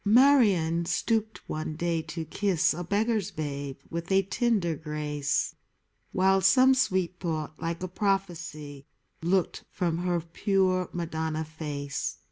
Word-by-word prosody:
Marion 205 Hz, -, +5 dB
stooped 220 Hz, +4 st, -1 dB
one 155 Hz, 0 st, -4 dB
day 170 Hz, 0 st, 0 dB
to 160 Hz, +1 st, -6 dB
kiss 185 Hz, +1 st, +1 dB
A 175 Hz, +3 st, -4 dB
beggar's 210 Hz, +2 st, 0 dB
babe 140 Hz, -5 st, -4 dB
with 170 Hz, +2 st, -4 dB
a 195 Hz, 0 st, +4 dB
tender 195 Hz, -4 st, +1 dB
grace; 150 Hz, -2 st, -2 dB, 0.6 s
While 190 Hz, +1 st, +3 dB
some 255 Hz, +7 st, +6 dB
sweet 185 Hz, -8 st, +1 dB
thought, 155 Hz, -3 st, -4 dB
like 170 Hz, +2 st, -3 dB
a -, -, -1 dB
prophecy, 170 Hz, -7 st, -3 dB, 0.3 s
Looked 180 Hz, +2 st, 0 dB
from 170 Hz, -3 st, -1 dB
her 175 Hz, -1 st, 0 dB
pure 185 Hz, +2 st, +1 dB
Madonna 160 Hz, -2 st, -2 dB
face. 150 Hz, -3 st, -4 dB
170 Hz, 125 wpm, -28 LUFS, 155-195 Hz, 0.6 s, some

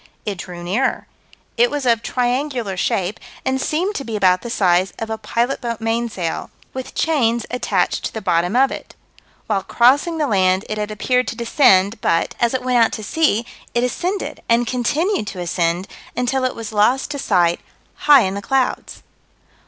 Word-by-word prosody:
It 200 Hz, -4 st, -3 dB
drew 175 Hz, -1 st, -7 dB
nearer. 205 Hz, +10 st, 0 dB, 0.5 s
It 240 Hz, +1 st, +4 dB
was 290 Hz, -2 st, -3 dB
of 230 Hz, -2 st, +3 dB
triangular 245 Hz, -3 st, -1 dB
shape, 185 Hz, +2 st, -1 dB, 0.3 s
and 265 Hz, 0 st, 0 dB
seemed 360 Hz, +9 st, 0 dB
to 275 Hz, -, -4 dB
be 230 Hz, -4 st, -5 dB
about 185 Hz, -3 st, +3 dB
the 235 Hz, -, -6 dB
size 185 Hz, -4 st, +2 dB
of 225 Hz, 0 st, -5 dB
a 220 Hz, -, -2 dB
pilot 235 Hz, +5 st, -1 dB
boat 235 Hz, -2 st, -3 dB
mainsail, 225 Hz, -6 st, -2 dB, 0.2 s
with 260 Hz, -1 st, -7 dB
chains 235 Hz, -8 st, +1 dB
attached 200 Hz, -7 st, 0 dB
to -, -, -3 dB
the 220 Hz, -, -5 dB
bottom 180 Hz, 0 st, 0 dB
of 265 Hz, +2 st, +4 dB
it. -, -, -8 dB, 0.5 s
While 200 Hz, -3 st, 0 dB
crossing 275 Hz, -, +3 dB
the 305 Hz, -, +1 dB
land 190 Hz, -5 st, +2 dB
it 215 Hz, -, -3 dB
had 210 Hz, 0 st, -2 dB
appeared 250 Hz, +4 st, 0 dB
to -, -, -3 dB
descend, 225 Hz, -4 st, +3 dB
but, 165 Hz, -, +1 dB
as 235 Hz, +2 st, +2 dB
it 255 Hz, -, -2 dB
went 250 Hz, -2 st, +4 dB
out -, -, +1 dB
to 215 Hz, -, -5 dB
sea, 235 Hz, -3 st, +1 dB, 0.3 s
it 240 Hz, -, +2 dB
ascended, 360 Hz, +10 st, -2 dB
and 235 Hz, +1 st, +3 dB
continued 260 Hz, -, 0 dB
to 190 Hz, -, -6 dB
ascend, 175 Hz, +1 st, -1 dB, 0.3 s
until 255 Hz, +1 st, 0 dB
it 255 Hz, -, -1 dB
was 225 Hz, -1 st, -7 dB
lost 245 Hz, +7 st, +2 dB
to 285 Hz, -, -4 dB
sight 175 Hz, -8 st, +2 dB, 0.3 s
high 290 Hz, -3 st, +6 dB
in 190 Hz, -3 st, 0 dB
the 200 Hz, -, -4 dB
clouds. 260 Hz, +5 st, -1 dB
230 Hz, 185 wpm, -20 LUFS, 195-260 Hz, 0.5 s, high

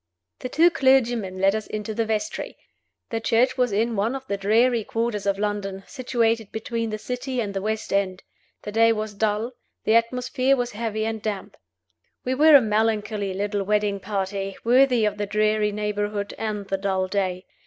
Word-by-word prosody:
The 255 Hz, -, -5 dB
two 335 Hz, +6 st, +4 dB
clergymen 240 Hz, -, +2 dB
led 195 Hz, +1 st, +3 dB
us 215 Hz, -1 st, -3 dB
into 215 Hz, +1 st, -4 dB
the 225 Hz, 0 st, -1 dB
vestry. 220 Hz, +7 st, -3 dB, 0.5 s
The 225 Hz, -, -1 dB
church 235 Hz, +3 st, +2 dB
was 250 Hz, -3 st, +1 dB
in 225 Hz, +3 st, 0 dB
one 220 Hz, +6 st, 0 dB
of 265 Hz, 0 st, -6 dB
the 200 Hz, -, -2 dB
dreary 225 Hz, +4 st, +2 dB
quarters 225 Hz, -2 st, -2 dB
of 200 Hz, 0 st, +1 dB
London, 200 Hz, -2 st, -3 dB
situated 230 Hz, -5 st, -1 dB
between 230 Hz, +1 st, -3 dB
the 215 Hz, -, -3 dB
City 250 Hz, +3 st, -4 dB
and 205 Hz, -4 st, -2 dB
the 195 Hz, -, -2 dB
West 220 Hz, +1 st, -3 dB
End; 195 Hz, -2 st, 0 dB, 0.4 s
the 210 Hz, -, -5 dB
day 230 Hz, +1 st, +4 dB
was 215 Hz, -1 st, -4 dB
dull; 215 Hz, +3 st, -1 dB, 0.3 s
the 220 Hz, -, +2 dB
atmosphere 250 Hz, +3 st, +2 dB
was 245 Hz, -2 st, -2 dB
heavy 220 Hz, 0 st, -2 dB
and 220 Hz, -1 st, -3 dB
damp. 210 Hz, -3 st, -4 dB, 0.7 s
We 255 Hz, -, 0 dB
were 300 Hz, +3 st, +7 dB
a 280 Hz, -, +9 dB
melancholy 210 Hz, -2 st, 0 dB
little 205 Hz, +1 st, -1 dB
wedding 210 Hz, 0 st, 0 dB
party, 195 Hz, 0 st, -3 dB
worthy 250 Hz, -1 st, +4 dB
of 210 Hz, 0 st, -1 dB
the 205 Hz, -, -1 dB
dreary 215 Hz, 0 st, +1 dB
neighborhood 205 Hz, -1 st, -2 dB
and 210 Hz, -2 st, -4 dB
the 195 Hz, -, -1 dB
dull 190 Hz, -1 st, 0 dB
day. 185 Hz, -1 st, -2 dB
215 Hz, 180 wpm, -24 LUFS, 205-235 Hz, 0.7 s, a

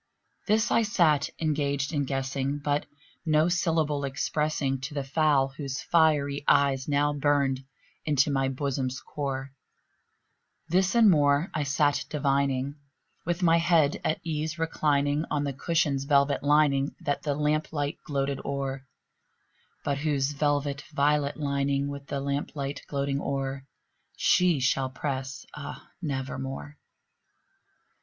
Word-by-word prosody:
This 215 Hz, +1 st, +2 dB
I 230 Hz, -, +4 dB
sat 170 Hz, -9 st, +2 dB
engaged 145 Hz, -1 st, -1 dB
in 145 Hz, -2 st, 0 dB
guessing, 135 Hz, +1 st, -2 dB
but 145 Hz, 0 st, -1 dB, 0.4 s
no 155 Hz, -1 st, +3 dB
syllable 160 Hz, -5 st, +1 dB
expressing 140 Hz, 0 st, -1 dB
To 145 Hz, +3 st, -6 dB
the 140 Hz, -, -1 dB
fowl 140 Hz, -1 st, +2 dB
whose 135 Hz, 0 st, -5 dB
fiery 150 Hz, -4 st, +2 dB
eyes 135 Hz, -2 st, +3 dB
now 145 Hz, 0 st, +2 dB
burned 140 Hz, -2 st, +1 dB, 0.4 s
into 145 Hz, -1 st, +2 dB
my 135 Hz, -1 st, +1 dB
bosom's 135 Hz, -1 st, -2 dB
core; 135 Hz, -2 st, -4 dB, 1.2 s
This 185 Hz, +5 st, +2 dB
and 230 Hz, -2 st, +6 dB
more 145 Hz, -1 st, +3 dB
I 155 Hz, -, -1 dB
sat 145 Hz, +1 st, +1 dB
divining, 140 Hz, -1 st, 0 dB, 0.5 s
with 175 Hz, +1 st, -1 dB
my 165 Hz, -1 st, +5 dB
head 165 Hz, -3 st, +3 dB
at 155 Hz, -, 0 dB
ease 160 Hz, 0 st, -3 dB
reclining 150 Hz, -2 st, +1 dB
On 145 Hz, -1 st, 0 dB
the 140 Hz, -1 st, -2 dB
cushion's 150 Hz, -2 st, 0 dB
velvet 140 Hz, 0 st, +3 dB
lining 145 Hz, -1 st, +3 dB
that 145 Hz, -, -1 dB
the 145 Hz, -2 st, -1 dB
lamp 150 Hz, +1 st, 0 dB
light 145 Hz, -2 st, -2 dB
gloated 140 Hz, -1 st, -2 dB
o'er, 135 Hz, -1 st, -4 dB, 1.0 s
But 140 Hz, -1 st, 0 dB
whose 145 Hz, -2 st, 0 dB
velvet 145 Hz, -1 st, 0 dB
violet 145 Hz, 0 st, +1 dB
lining 140 Hz, -1 st, 0 dB
with 140 Hz, -1 st, -7 dB
the 140 Hz, -, -3 dB
lamp 140 Hz, +2 st, -3 dB
light 140 Hz, -1 st, -4 dB
gloating 140 Hz, 0 st, -1 dB
o'er, 135 Hz, 0 st, -3 dB, 0.5 s
She 180 Hz, -5 st, +3 dB
shall 130 Hz, +1 st, +1 dB
press, 130 Hz, 0 st, -4 dB
ah, 145 Hz, -1 st, -8 dB
nevermore! 135 Hz, -1 st, -4 dB
145 Hz, 130 wpm, -27 LUFS, 140-150 Hz, 1.2 s, and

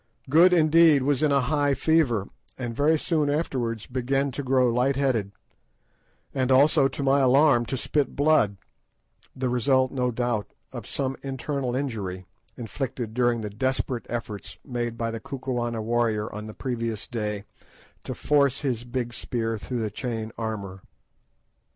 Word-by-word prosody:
Good, 170 Hz, +4 st, +7 dB
indeed, 160 Hz, -3 st, +5 dB
was 140 Hz, -1 st, +1 dB
in 155 Hz, -2 st, +3 dB
a 140 Hz, -1 st, +4 dB
high 145 Hz, +1 st, +1 dB
fever, 135 Hz, -12 st, +2 dB, 0.3 s
and 120 Hz, -3 st, -4 dB
very 150 Hz, +4 st, +3 dB
soon 155 Hz, -2 st, 0 dB
afterwards 125 Hz, -7 st, -2 dB
began 135 Hz, +2 st, -1 dB
to 135 Hz, -, -4 dB
grow 130 Hz, -1 st, +3 dB
light 125 Hz, +3 st, +2 dB
headed, 125 Hz, -8 st, 0 dB, 1.0 s
and 130 Hz, -1 st, 0 dB
also, 140 Hz, +1 st, +5 dB
to 135 Hz, +1 st, -5 dB
my 135 Hz, +1 st, +4 dB
alarm, 135 Hz, -2 st, +4 dB
to 130 Hz, -, -2 dB
spit 145 Hz, +3 st, -1 dB
blood, 145 Hz, -9 st, +3 dB, 0.8 s
the 130 Hz, 0 st, -2 dB
result, 130 Hz, +1 st, +2 dB
no 125 Hz, -2 st, 0 dB
doubt, 120 Hz, -3 st, -1 dB, 0.3 s
of -, -, -7 dB
some 135 Hz, -1 st, -2 dB
internal 135 Hz, -1 st, -3 dB
injury, 100 Hz, -9 st, -3 dB, 0.3 s
inflicted 120 Hz, -1 st, -4 dB
during 120 Hz, -1 st, +1 dB
the 105 Hz, -1 st, -5 dB
desperate 130 Hz, +1 st, -2 dB
efforts 110 Hz, -3 st, -5 dB
made 120 Hz, -3 st, -3 dB
by 115 Hz, -1 st, -2 dB
the 115 Hz, -, -5 dB
Kukuana 120 Hz, -3 st, -3 dB
warrior 115 Hz, -2 st, 0 dB
on 105 Hz, +1 st, -6 dB
the 110 Hz, -, -9 dB
previous 115 Hz, -4 st, -3 dB
day 105 Hz, -3 st, -3 dB, 0.6 s
to -, -, -5 dB
force 140 Hz, -3 st, +2 dB
his 125 Hz, -5 st, -1 dB
big 120 Hz, -1 st, -3 dB
spear 115 Hz, -1 st, -2 dB
through 125 Hz, +2 st, -4 dB
the 105 Hz, -, -3 dB
chain 115 Hz, 0 st, -4 dB
armour. 100 Hz, -4 st, -5 dB
125 Hz, 150 wpm, -25 LUFS, 115-140 Hz, 1.0 s, Good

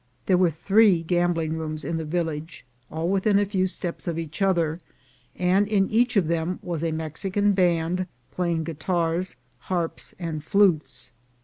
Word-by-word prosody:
There 185 Hz, -, +4 dB
were 180 Hz, -2 st, +4 dB
three 190 Hz, +2 st, +4 dB
gambling 170 Hz, -2 st, 0 dB
rooms 155 Hz, -1 st, -5 dB
in 165 Hz, -, -2 dB
the 160 Hz, -, -3 dB
village, 160 Hz, 0 st, -3 dB, 0.2 s
all 160 Hz, +2 st, -2 dB
within 195 Hz, +2 st, +2 dB
a 205 Hz, -, +3 dB
few 190 Hz, -2 st, 0 dB
steps 180 Hz, -2 st, -5 dB
of 170 Hz, -1 st, -1 dB
each 165 Hz, +3 st, -6 dB
other, 170 Hz, -4 st, +2 dB, 0.6 s
and 185 Hz, +3 st, +2 dB
in 200 Hz, -2 st, +2 dB
each 240 Hz, +1 st, +3 dB
of 190 Hz, -, +4 dB
them 170 Hz, +2 st, -1 dB
was 170 Hz, -3 st, -3 dB
a 165 Hz, -, 0 dB
Mexican 185 Hz, +6 st, 0 dB
band 180 Hz, -1 st, +1 dB, 0.2 s
playing 170 Hz, -3 st, -1 dB
guitars, 170 Hz, +2 st, -1 dB, 0.2 s
harps 175 Hz, -3 st, -3 dB
and 165 Hz, -4 st, -4 dB
flutes. 185 Hz, -8 st, +1 dB
175 Hz, 155 wpm, -25 LUFS, 160-190 Hz, 0.6 s, There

